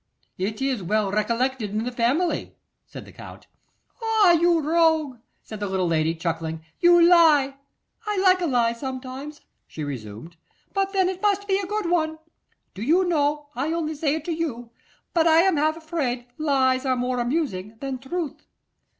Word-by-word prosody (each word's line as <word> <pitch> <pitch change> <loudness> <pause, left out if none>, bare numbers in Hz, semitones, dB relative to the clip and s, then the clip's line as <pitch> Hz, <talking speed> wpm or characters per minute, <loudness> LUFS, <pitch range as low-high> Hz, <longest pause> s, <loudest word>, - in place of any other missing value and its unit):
'It 210 +5 -2
is 265 -5 -1
well 205 +2 0
recollected 235 +2 -1
in 215 +2 -2
the 250 - -3
family,' 255 +9 0 0.3
said - - -10
the - - -14
Count. - - -12 0.6
'Ah! 440 -4 +4
you 340 0 +4
rogue!' 315 -4 +2 0.2
said 215 - -9
the 205 - -2
little 190 -1 -1
lady, 165 -1 +1
chuckling, 160 -1 -4
'you 345 0 +6
lie! 305 -6 +5 0.5
I 420 -1 -1
like 370 -1 +4
a 345 - 0
lie 240 -4 +2
sometimes,' 265 +4 -7 0.3
she 155 - -7
resumed, 130 +3 -7 0.4
'but 390 -1 0
then 380 -2 +2
it 375 0 -4
must 405 -1 +1
be 385 -1 +2
a 390 - -4
good 420 -1 -2
one. 315 -2 0 0.6
Do 195 - -9
you 335 +10 +3
know, 295 -3 0
I 285 +5 -2
only 320 -2 -2
say 300 -1 0
it 315 -1 -6
to 345 - -2
you, 245 -8 -4 0.4
but 335 -1 +3
I 325 0 +6
am 375 -3 +2
half 310 +2 +1
afraid 290 -7 -3
lies 265 -4 +2
are 260 -2 +1
more 250 0 -1
amusing 240 - -2
than 270 -2 -4
truth. 310 +4 -5
280 Hz, 175 wpm, -24 LUFS, 230-335 Hz, 0.6 s, you